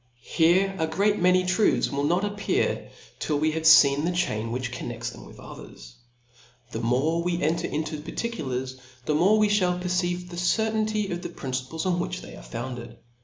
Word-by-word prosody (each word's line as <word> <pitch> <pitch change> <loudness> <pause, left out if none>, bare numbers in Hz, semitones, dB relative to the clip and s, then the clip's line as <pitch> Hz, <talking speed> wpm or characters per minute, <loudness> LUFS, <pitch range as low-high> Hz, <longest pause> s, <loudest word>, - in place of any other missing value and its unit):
Here 185 +4 +2
d 160 - +2
great 200 +6 +1
many 180 +1 +4
truths 185 +4 +2
will 140 +1 -1
not 175 +6 +1
appear, 205 0 -1 0.3
till 150 - -1
w6 155 +1 +1
have 160 - -2
fccn 145 -2 +6
the 170 - +1
chain 115 -11 -1
which 125 0 -3
connects 120 -1 -5
thi*m - - -12
with - - -14
others. - - -12 0.8
The 110 - -4
more 130 +8 +1
we 175 0 -1
enter 160 +2 0
into 155 0 -3
particulars, 130 - -4 0.3
the 150 - +1
more 185 +8 +4
we 215 -1 +4
fhall 180 -4 +1
perceive 180 0 -1
the 175 - -8
cer^ 220 +5 +1
ttiiity 215 -2 -1
of 175 0 -3
the - - -5
principles 130 +5 -4
on 180 -1 +1
which 175 - -3
they - - -10
are - - -11
founded. 120 - -7
165 Hz, 185 wpm, -26 LUFS, 130-180 Hz, 0.8 s, fccn